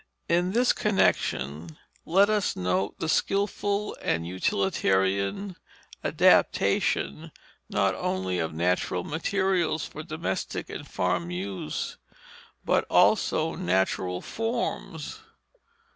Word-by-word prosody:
In 175 +2 +2
this 245 +2 +4
connection, 80 - 0 0.3
let 195 +4 +5
us 210 -2 +1
note 90 +2 -1
the 165 - -3
skilful 200 +3 0
and 80 0 0
utilitarian 95 - 0 0.5
adaptation 70 - +2 0.4
not - - +2
only 95 -1 -2
of 80 -1 -1
natural 90 +2 0
materials 175 - 0
for 155 - -8
domestic 155 - -4
and - - -7
farm 90 -1 -1
use, 90 -3 -4 0.7
but - - +3
also - - +3
natural 90 0 0
forms. 235 - -3
95 Hz, 95 wpm, -27 LUFS, -, 0.7 s, let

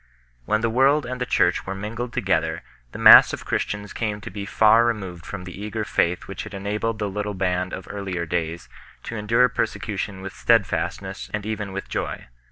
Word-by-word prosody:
When 110 +7 +1
the 115 - +1
world 135 +4 +3
and 125 0 -5
the 125 - -1
Church 90 -7 +2
were 95 - -3
mingled 115 +5 -5
together, 95 -7 0 0.3
the - - -8
mass - - +9
of - - -6
Christians 105 0 -3
came 105 -2 -2
to - - -8
be 100 0 -6
far 110 +3 +5
removed 95 -7 -3
from 100 -3 -6
the 90 +2 -9
eager 105 +1 -3
faith 90 -3 0
which 95 - -6
had 110 -2 -9
enabled 105 +3 -2
the 105 -1 -2
little 105 +1 -3
band 90 -1 -1
of 95 - -7
earlier 95 -4 -4
days 85 0 -3 0.4
to 115 - -6
endure 115 +4 +3
persecution 95 -5 -3
with 95 - -6
steadfastness 95 -3 0
and 105 -1 -5
even 105 -2 -3
with 95 +1 -5
joy. - - -4
105 Hz, 190 wpm, -23 LUFS, 95-110 Hz, 0.4 s, mass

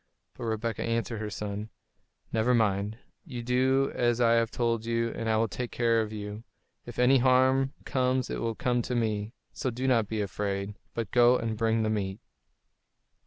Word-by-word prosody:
But - - -7
Rebekah 110 0 -2
answered 115 -1 -1
her 105 - -3
son, 105 +1 -5 0.6
"Never 115 +2 +3
mind; 105 -1 +1 0.3
you 120 -3 -6
do 130 +2 +2
as 120 -1 +1
I 115 -1 +4
have 115 -1 +3
told 115 -2 0
you, 115 0 0
and 115 - -3
I 110 - +3
will 115 +1 +2
take 120 +3 -4
care 115 -1 +2
of 110 -1 -4
you. 105 0 -6 0.4
If 120 - -8
any 130 +2 +5
harm 130 +1 +3
comes 130 -1 +1
it - - -3
will 115 -1 -1
come 125 +1 +1
to 125 - -3
me; 110 0 -1 0.2
so 130 - -2
do 125 +2 -3
not 115 -5 +3
be 110 0 -3
afraid, 100 0 -2 0.2
but 115 -3 -3
go 120 0 +6
and 115 -2 -2
bring 115 0 +1
the 110 - +1
meat." 100 -1 -2
115 Hz, 185 wpm, -28 LUFS, 110-125 Hz, 0.6 s, go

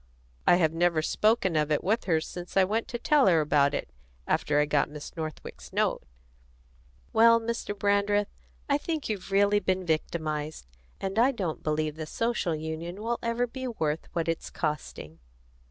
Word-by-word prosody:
I - - +7
have 160 -3 +2
never 165 -1 +2
spoken 210 -2 +2
of 155 0 +1
it 150 - +1
with 220 +5 +1
her 165 -4 +2
since 175 +3 -7
I 190 - +7
went 215 +4 -1
to 240 - -4
tell 285 +3 +3
her 170 -4 +5
about 145 -1 +3
it, - - -4 0.3
after 150 0 +1
I 150 - +4
got 145 -1 +1
Miss 150 0 -9
Northwick's 155 -2 -7
note." - - +1 1.1
"Well, 230 0 +6
Mr. 230 -2 -4
Brandreth, 205 0 +1 0.3
I 280 0 +2
think 315 -4 -3
you've 205 -3 -4
really 205 +1 +4
been 185 -1 -1
victimised; 155 - -2 0.3
and 195 +3 -2
I 255 +4 +5
don't 185 - -3
believe 155 0 -1
the 155 -1 -5
Social 230 -5 -1
Union 160 +4 -5
will 235 +1 -1
ever 235 +1 0
be 260 +2 -6
worth 160 -10 -2
what 165 -1 -1
it's 165 0 -2
costing." 150 - -4
180 Hz, 170 wpm, -28 LUFS, 155-220 Hz, 1.1 s, I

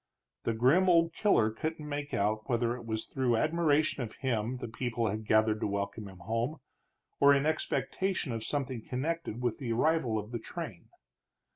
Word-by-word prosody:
The 115 - +1
grim 145 +11 +4
old 165 -1 +4
killer 115 - +3
couldn't 155 +6 -4
make 145 0 -4
out 110 +4 0
whether 120 -1 +1
it 120 -2 -9
was 110 -1 -2
through 125 -4 +1
admiration 155 -1 +2
of 115 -3 -5
him 125 -2 -1
the 125 - -5
people 115 -1 -1
had 110 +1 -4
gathered 110 0 +3
to - - 0
welcome 100 +1 -3
him 95 -1 -11
home, 115 - -2 0.6
or 140 0 +7
in 140 +1 +1
expectation 160 +1 -1
of 115 -1 -3
something 130 -2 -2
connected 130 -2 -3
with 120 -2 0
the 125 -5 -3
arrival 125 -3 +2
of 105 +1 -5
the 120 - -3
train. 115 - -7
120 Hz, 175 wpm, -31 LUFS, 110-150 Hz, 0.6 s, or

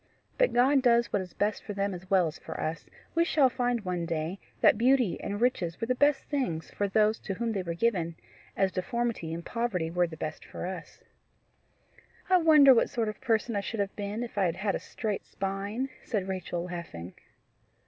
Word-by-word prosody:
But - - +3
God 265 +3 +4
does 235 -2 +3
what 200 - +2
is 180 -2 -9
best 205 +1 0
for 205 - -5
them 200 0 -1
as 180 +1 -9
well 190 -3 +4
as 160 - -5
for - - -7
us. 155 0 -3 0.3
We 335 - +4
shall 285 -6 +3
find 245 -2 0
one 175 -2 -2
day 165 +3 -2 0.2
that - - +6
beauty 240 -4 +2
and 205 +1 -3
riches 190 -9 0
were - - -1
the 255 - +1
best 285 +2 +3
thing 260 - -1
for 200 +5 -3
those 215 +2 +2
to 195 - -4
whom 230 +3 -1
they 200 -3 -1
were 170 -2 -4
given, 170 -5 0 0.4
as 195 -1 +2
deformity 235 -4 -2
and 170 +1 -5
poverty 205 -9 -1
were 175 0 +2
the 160 -1 -9
best 155 - -5
for - - -7
us." 180 -2 -7 1.3
"I 370 - +8
wonder 305 -5 +7
what 235 - +3
sort 225 -2 -1
of 215 - -8
person 230 -1 +1
I 200 - +1
should 220 +2 -5
have 200 -1 -1
been 205 +3 -3
if 230 -3 -5
I 195 - +3
had 170 -1 0
had 195 +2 -1
a - - -1
straight 215 -4 -4
spine!" 200 +6 -3
said 200 -5 -2
Rachel 180 -2 -3
laughing. 170 - -7
200 Hz, 210 wpm, -29 LUFS, 180-240 Hz, 1.3 s, I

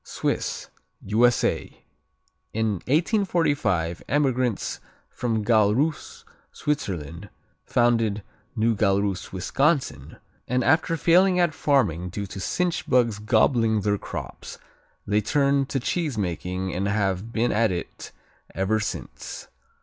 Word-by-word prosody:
Swiss - - -3 0.4
U.S.A. 115 +4 +1 0.7
In 110 0 0 0.2
1845 145 - +1
emigrants 130 -6 0 0.3
from 110 -3 -2
Galrus, 115 +7 +1 0.3
Switzerland, 90 - -3 0.4
founded 115 -4 +1 0.3
New 115 0 +2
Galrus, 100 -1 0
Wisconsin 130 - 0 0.3
and, 125 +1 +1
after 160 +4 +2
failing 180 +3 +4
at 175 -3 +2
farming 90 - +1
due 100 +3 -4
to 100 0 -8
cinch 175 - -1
bugs 115 -5 +2
gobbling 110 0 +2
their 100 0 0
crops, - - -7 0.5
they 105 +1 +1
turned 140 +3 +1
to 135 - -1
cheesemaking 95 - -2
and 95 +2 -1
have 100 +1 -1
been 120 +1 +1
at 110 -1 +2
it 90 - -6 0.4
ever 100 +3 +1
since. 110 - -6
110 Hz, 105 wpm, -25 LUFS, 100-140 Hz, 0.7 s, failing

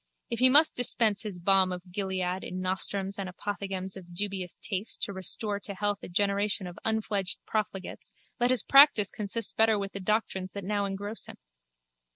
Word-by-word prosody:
If 235 - -2
he 255 +1 +8
must 300 +4 +6
dispense 230 -4 +1
his 205 -4 -5
balm 190 +1 +3
of 180 0 -7
Gilead 185 -1 -2
in 185 - -5
nostrums 190 +1 -1
and 190 -2 -3
apothegms 190 0 -3
of 175 -2 -12
dubious 195 -2 -3
taste 200 +1 -1
to 200 - -2
restore 200 +3 -2
to 200 -1 -6
health 205 +1 0
a - - -9
generation 200 +1 0
of 180 +2 -9
unfledged 215 -4 0
profligates 210 -3 -4 0.3
let 245 +1 +3
his 255 -1 +2
practice 275 -8 +6
consist 215 +1 -2
better 220 -1 +4
with 200 -1 -4
the 200 - -6
doctrines 190 -2 -1
that 200 - -6
now 205 +1 -1
engross 200 +3 -3
him. - - -9
200 Hz, 180 wpm, -28 LUFS, 190-215 Hz, 0.3 s, he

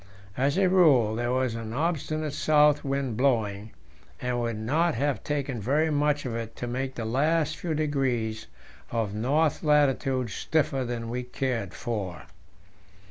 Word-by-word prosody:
As 140 +5 +1
a 195 -1 +4
rule, 150 - +5
there 120 +1 -1
was 130 -2 0
an 115 -1 -5
obstinate 155 0 -1
south 150 -1 +4
wind 135 -5 -2
blowing, 110 -6 +1 0.5
and 125 - -2
it - - -1
would 115 -2 -2
not 155 +10 +1
have 140 +2 -1
taken 140 -5 -2
very 150 +8 +1
much 145 -1 +1
of 120 -3 -3
it 115 -1 -5
to - - -5
make 130 +2 -3
the 115 - -4
last 155 +6 +1
few 165 -3 -3
degrees 130 -7 -1 0.4
of 115 -4 -2
north 150 +8 +1
latitude 135 -5 +2
stiffer 140 -2 0
than 120 -1 -4
we 125 +1 -2
cared 125 -6 -3
for. 100 -7 -4
130 Hz, 155 wpm, -27 LUFS, 115-150 Hz, 0.5 s, rule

